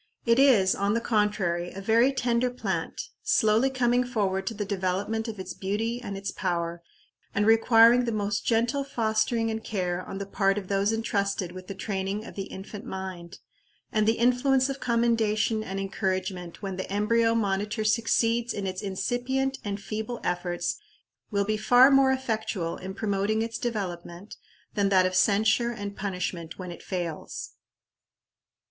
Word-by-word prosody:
It 230 +1 +4
is, 230 -9 +5
on 200 +2 0
the - - +2
contrary, 205 -6 0
a 195 - -7
very 230 +6 +3
tender 250 -2 +1
plant, 250 - -4
slowly 220 +5 +3
coming 250 -1 +2
forward 200 -6 -1
to 225 - -2
the 205 0 -3
development 200 +3 -1
of 215 -3 -6
its 190 - -5
beauty 225 +5 -2
and 200 -4 -5
its 195 0 -4
power, 170 0 -2 0.5
and 205 - +2
requiring 230 +2 +6
the 235 - -1
most 205 -1 -1
gentle 240 +5 +1
fostering 225 -2 0
and 220 0 -4
care 180 -3 -2
on 195 - -7
the 200 - -4
part 195 0 +1
of 195 -3 -5
those 200 +1 +2
intrusted 200 -5 -1
with 185 0 -10
the 195 - -6
training 195 +1 -3
of - - -9
the 195 - -4
infant 200 +2 -8
mind; 190 -4 -7 0.5
and 215 -1 +1
the 225 - +3
influence 255 +3 +3
of 275 0 -4
commendation 230 -2 +1
and 195 -1 -4
encouragement 190 -2 -3
when 190 -2 -4
the 190 - -5
embryo 225 +3 +2
monitor 210 0 0
succeeds 230 +2 +1
in 200 - -3
its 185 -1 -3
incipient 245 +7 -1
and 205 -1 -3
feeble 220 +4 -4
efforts, 175 - -2 0.5
will 200 -2 0
be 215 +1 0
far 245 +5 +6
more 270 -1 +5
effectual 220 -9 -2
in 190 +1 -7
promoting 210 +1 0
its 230 0 -4
development, 190 -4 -5 0.4
than 200 -2 +1
that 185 -2 +4
of 185 - 0
censure 215 +5 +3
and 205 -4 -5
punishment 180 -4 -4
when 180 -2 -6
it 170 - -10
fails. 175 -4 -5
210 Hz, 165 wpm, -27 LUFS, 190-230 Hz, 0.5 s, requiring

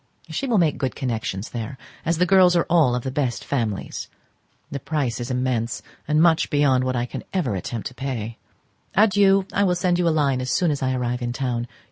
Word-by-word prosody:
She 275 - -2
will 235 -4 +2
made 165 -5 +2
good 130 -2 -2
connections 115 -6 -3
there, 120 +3 -5 0.3
as 165 0 +2
the 180 - +3
girls 180 -1 +5
are 170 - +3
all 155 -8 +4
of 125 - -3
the 130 - -3
best 130 -3 -2
families. 115 -8 -2 0.6
The 140 - -3
price 135 -5 -2
is 120 +2 -4
immense, 125 -2 -1 0.2
and 150 +1 +2
much 165 -1 +4
beyond 140 -4 +3
what 130 0 -1
I 120 0 0
can - - -7
ever 150 - 0
attempt 105 +5 -4
to - - -16
pay. 120 -3 -4 0.6
Adieu, 195 -1 +4
I 200 - +2
will 180 -2 +2
send 175 0 +1
you 175 - +2
a - - +5
line 140 -5 +1
as 130 - -3
soon 170 +4 +2
as 145 - -2
I 130 -1 0
arrive 125 0 -2
in 120 0 -2
town. 125 -2 -2
135 Hz, 215 wpm, -23 LUFS, 120-170 Hz, 0.6 s, girls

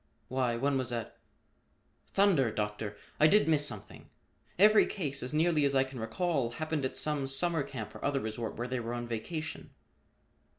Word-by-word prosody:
"Why, 125 -2 0
one 135 +2 +1
was 130 -1 -2
at 115 -2 -4 0.9
Thunder, 175 - +3
Doctor! 105 -1 -3 0.2
I 155 - +7
did 210 +4 +4
miss 150 -2 +4
something. 105 -4 -7 0.5
Every 210 +3 +6
case, 145 -8 -3
as 125 - -3
nearly 155 0 +2
as 140 -1 +2
I 135 - +5
can 130 -1 -8
recall, 125 +1 -1
happened 155 0 -2
at 130 - -1
some 150 -3 0
summer 160 +4 +2
camp 120 -6 -6
or - - -10
other 140 -1 +1
resort 110 -1 -4
where 120 +2 -3
they 130 0 -2
were 115 +1 -4
on 120 0 -4
vacation." 155 +8 -5
135 Hz, 175 wpm, -31 LUFS, 120-155 Hz, 0.9 s, I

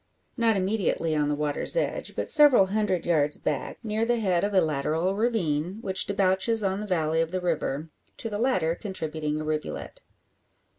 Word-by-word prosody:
Not 230 -4 +2
immediately 185 -5 0
on 150 -1 +1
the 145 - 0
water's 150 - +1
edge, - - -2
but - - -2
several 290 -9 +6
hundred 210 -5 0
yards 150 -4 +2
back, 150 -3 -3
near 215 0 -1
the 240 +1 +2
head 185 -5 +1
of 205 - 0
a 195 - +4
lateral 160 +3 0
ravine 190 -6 0
which 190 -4 -2
debouches 200 +3 +1
on 195 0 0
the 210 - -5
valley 160 -3 +1
of 165 - -1
the 185 +2 -2
river, 160 -3 -2 0.3
to - - -4
the 210 -2 -4
latter 205 -10 +1
contributing 155 -6 -3
a - - -4
rivulet. 155 0 -4
185 Hz, 180 wpm, -26 LUFS, 155-210 Hz, 0.3 s, several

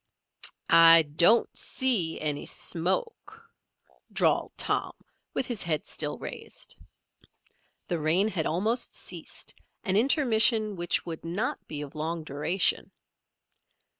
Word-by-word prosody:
"I, 165 0 +8
don't, 170 +10 +3
see, 220 -11 +1
any, 150 -2 -2
smoke," 425 - -2 0.6
drawled - - +1
Tom, - - -2 0.4
with - - -1
his 240 -5 -3
head 155 -3 -2
still - - -3
raised. - - -8 1.1
The 175 - -2
rain 165 +7 +3
had 170 -7 -2
almost 215 +9 -1
ceased, - - -5 0.3
an 190 -4 0
intermission 225 -3 +3
which 175 -1 -1
would 165 -2 -7
not 185 +9 -3
be 150 -1 -5
of 140 - -10
long 160 +2 -4
duration. 155 +6 0
175 Hz, 110 wpm, -27 LUFS, 160-225 Hz, 1.1 s, I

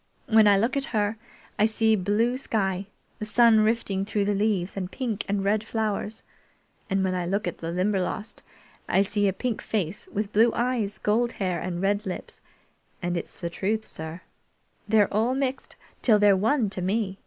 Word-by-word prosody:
When 220 -3 +6
I 200 -1 +6
look 230 +7 +1
at 275 -1 0
her, 210 +1 0 0.4
I 210 - +5
see 220 0 +2
blue 210 +5 +1
sky, 195 -7 -1 0.3
the 215 - -3
sun 225 +1 +5
rifting 215 -3 +1
through 205 0 -1
the 205 - +1
leaves 200 -3 0
and 185 -2 -4
pink 230 -6 -3
and 200 -1 0
red 205 +2 +1
flowers; 220 -1 -3 0.7
and 195 0 +1
when 185 -1 0
I 180 -1 -2
look 200 +4 -1
at - - -4
the 165 0 -4
Limberlost 190 +3 -1 0.5
I 195 - +4
see 205 0 +1
a - - +3
pink 235 +4 -3
face 200 -2 -3
with 210 0 -3
blue 225 +3 +5
eyes, 235 -4 -1
gold 235 +3 +1
hair, 185 -3 -2
and 180 0 -3
red 205 +1 +1
lips, 185 - -6 0.6
and, 175 -1 -2
it's 170 - -6
the 170 -2 -4
truth, 215 +5 -1
sir, 160 +2 -7 0.7
they're 210 -2 +4 0.3
mixed 270 0 -3 0.3
till 220 -4 +5
they're 205 -1 +5
one 220 +2 +1
to 190 - -3
me! 195 +1 -1
205 Hz, 180 wpm, -26 LUFS, 190-220 Hz, 0.7 s, When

